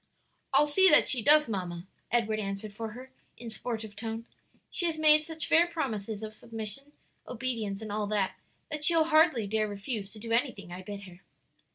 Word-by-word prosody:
"I'll 295 - +5
see 380 +6 +5
that 300 - +7
she 250 - +1
does, 300 +5 +6
mamma," 180 -5 -4 0.3
Edward 220 -2 +1
answered 195 0 -4
for 220 +1 -6
her, 255 +3 -11 0.3
in 235 -1 -8
sportive 220 -2 -5
tone; 225 +2 -5 0.5
"she 345 - +1
has 325 -1 -2
made 305 -1 +6
such 320 0 -3
fair 335 +2 +4
promises 220 - -4
of 215 0 -6
submission, 230 +5 -6 0.3
obedience, 225 -4 -3
and 215 - -6
all 210 0 -1
that, 205 -2 0 0.4
that 300 0 -3
she'll 330 +1 +5
hardly 310 -7 +4
dare 215 +1 0
refuse 205 0 -4
to 215 - -10
do 230 +2 -7
anything 230 -6 -1
I 180 +1 -7
bid 200 +1 -8
her." 180 -1 -13
225 Hz, 185 wpm, -29 LUFS, 205-290 Hz, 0.5 s, that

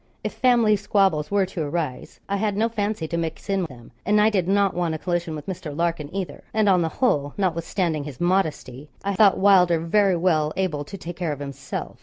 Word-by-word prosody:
If - - -3
family 235 -4 +4
squabbles 195 -7 +1
were 200 -1 +2
to 180 -2 -5
arise, 150 -3 -4
I 200 - -1
had 205 -1 -1
no 225 +2 +2
fancy 210 -6 -2
to 170 - -3
mix 165 +4 -4
in 195 -2 +1
them; 120 -6 -12
and 210 0 +3
I 215 +1 +4
did 185 -4 0
not 200 0 +2
want 170 -2 -1
a - - -3
collision 175 -1 -2
with 150 - -8
Mr. 160 -6 -6
Larkin 165 -3 -1
either; 190 -1 -5
and, 215 -1 +3
on 185 -3 +4
the 165 - 0
whole, 145 - 0
notwithstanding 170 -4 -1
his 145 -4 -8
modesty, 155 -7 -1
I 200 0 -1
thought 200 0 +5
Wylder 185 -3 +5
very 190 +4 +2
well 155 -3 +1
able 170 -6 -1
to 195 - -8
take 175 -1 -8
care 175 -3 -2
of 145 - -4
himself. 140 -1 -6
175 Hz, 215 wpm, -23 LUFS, 155-200 Hz, -, thought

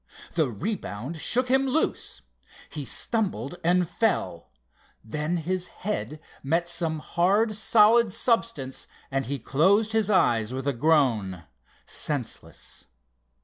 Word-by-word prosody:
The 160 -6 +1
rebound 150 - -5
shook 250 +2 +2
him 265 +1 +2
loose. 305 +5 -1 0.5
He 150 -3 -5
stumbled 190 - -2
and 175 +1 +3
fell. 155 - -1 0.5
Then 150 +9 -2
his 180 +2 -2
head 185 -6 -4 0.2
met 165 +5 0
some 165 -2 -1
hard 195 +8 +1
solid 220 +1 +4
substance 185 - 0 0.2
and 135 -1 -1
he 140 +2 -2
closed 190 - +2
his 220 -2 +2
eyes 120 - +2
with 135 +1 -4
a 140 - +2
groan—senseless. 115 - -2
165 Hz, 110 wpm, -26 LUFS, 135-210 Hz, 0.5 s, solid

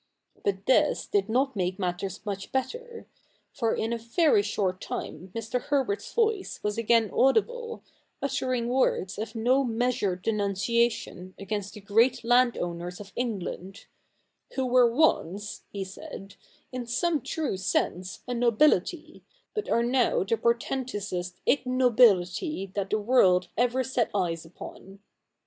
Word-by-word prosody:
But 195 0 -1
this 300 +3 +3
did 200 +1 0
not 265 +3 +1
make 185 -1 -1
matters 185 +1 -3
much 200 -2 -5
better; 470 - -4 0.5
for 230 -2 0
in 225 +1 -1
a 235 - -2
very 235 - +3
short 195 -3 -1
time 180 +4 -6
Mr. 230 +2 -2
Herbert's 285 - -1
voice 445 -4 0
was 210 0 -1
again 230 -1 +2
audible, 465 - +1 0.4
uttering 255 -3 -1
words 240 -6 +1
of 220 +1 -5
no 250 +5 +3
measured 225 -6 -1
denunciation 205 -2 0
against 200 0 -4
the 210 - -9
great 230 +6 +3
land 245 +1 +4
owners 175 +1 -4
of 200 -2 -11
England, 195 -5 -4 0.3
' - - -26
who 265 - 0
were 250 -1 +5
once,' 205 - 0
he 200 -1 -3
said, 195 +1 -9 0.2
' - - -34
in 250 -2 -4
some 315 +5 0
true 310 -2 -2
sense 185 -1 -1
a 250 - -2
Nobility, 245 - +2 0.3
but 425 -1 -3
are 235 - +3
now 245 -3 +2
the 205 +4 +1
portentousest 225 -6 -2
Ignobility 245 - +3
that 200 -1 -2
the 215 - +2
world 190 -6 +3
ever 250 +2 +2
set 250 -2 0
eyes 170 -4 -1
upon.' 190 +3 -11
230 Hz, 140 wpm, -27 LUFS, 195-255 Hz, 0.5 s, were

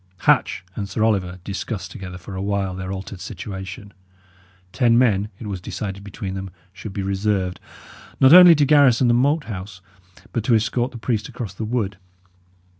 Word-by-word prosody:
Hatch 90 - +2
and 100 -2 -4
Sir 110 - -1
Oliver 95 -5 0
discussed 100 +1 -5
together 95 -5 -8
for 95 +2 -9
a 95 - -4
while 100 -1 -1
their 95 +1 -5
altered 95 0 -7
situation; 95 +1 -7 0.8
ten 115 +5 +3
men, 105 -5 +2
it 110 - -9
was 100 -3 -5
decided 100 +1 -5
between 100 -1 -6
them, 95 0 -5 0.2
should 100 +2 -8
be 95 0 -4
reserved, 95 -2 -1 0.6
not 135 +3 +7
only 180 -1 +10
to 145 -1 +3
garrison 135 -4 +5
the 120 - +4
Moat 145 +6 +2
House, 95 -4 -7 0.5
but 115 - -1
to 120 - +4
escort 120 +3 0
the 120 - -9
priest 110 -2 -2
across 110 -6 -6
the 110 - -5
wood. 105 -4 -2
100 Hz, 175 wpm, -22 LUFS, 95-120 Hz, 0.8 s, only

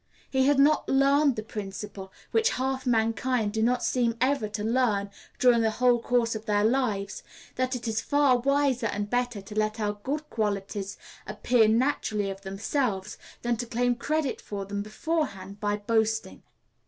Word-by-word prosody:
He 265 0 +3
had 290 -1 +4
not 290 +3 +4
learned 275 0 +4
the 215 - -4
principle 200 -2 -7 0.2
which 450 +1 +3
half 260 0 -2
mankind 225 -1 +1
do 220 - 0
not 245 +2 +2
seem 235 -2 +1
ever 255 -4 +1
to 210 0 -4
learn 220 -4 +1 0.3
during 245 -2 +4
the 225 - +3
whole 245 -1 +4
course 235 -1 +1
of 220 +1 -7
their 205 -1 +2
lives 220 -4 0 0.3
that 255 0 -1
it 240 -1 -5
is 220 -1 0
far 285 -4 +3
wiser 275 -2 +1
and 205 0 -3
better 245 -3 -1
to 200 - -10
let 215 +1 -1
our 205 -1 0
good 300 +6 -3
qualities 200 -2 -2 0.3
appear 220 +2 +3
naturally 220 -4 +1
of 195 0 -9
themselves, 200 +1 -2 0.2
than 240 -1 0
to 240 +1 -4
claim 245 +2 +1
credit 295 +3 -2
for 200 -1 -5
them 200 +1 -3
beforehand 215 - -3
by 205 0 0
boasting. 220 +1 -1
230 Hz, 165 wpm, -27 LUFS, 210-255 Hz, 0.3 s, had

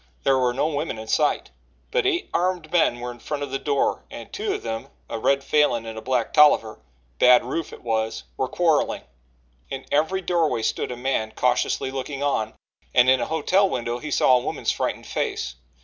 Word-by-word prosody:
There 135 -1 +3
were 125 -1 +2
no 130 +4 0
women 150 -4 -2
in 110 0 -8
sight, 150 +5 +1 0.4
but 485 -5 +2
eight 365 -2 0
armed 180 -3 0
men 160 -8 +3
were 125 0 -4
in 120 - -13
front 145 +4 -4
of 140 - -5
the 135 - -2
door 140 -2 0
and - - -10
two 410 +1 -2
of - - -7
them, 115 0 -4 0.2
a 115 - -4
red 140 +4 +2
Falin 135 -6 +2
and 110 0 -6
a 110 - -6
black 125 -1 -1
Tolliver 150 -8 +5 0.4
Bad 125 -1 +6
Rufe 160 +6 -3
it - - -12
was 110 -1 -1
were 130 - -1
quarrelling. 165 0 +1 0.7
In 135 -1 -6
every 160 +6 +1
doorway 165 -10 +1
stood - - -1
a 125 - -5
man 120 -4 -1
cautiously 130 - +1
looking 135 +1 -4
on, 110 -6 -1 0.4
and 125 0 +6
in 130 -1 +3
a - - 0
hotel 185 +5 +2
window 120 -3 -2
he 150 - -6
saw 130 -2 +4
a 125 - -3
woman's - - -1
frightened - - -3
face. - - -2
135 Hz, 200 wpm, -24 LUFS, 120-155 Hz, 0.7 s, Bad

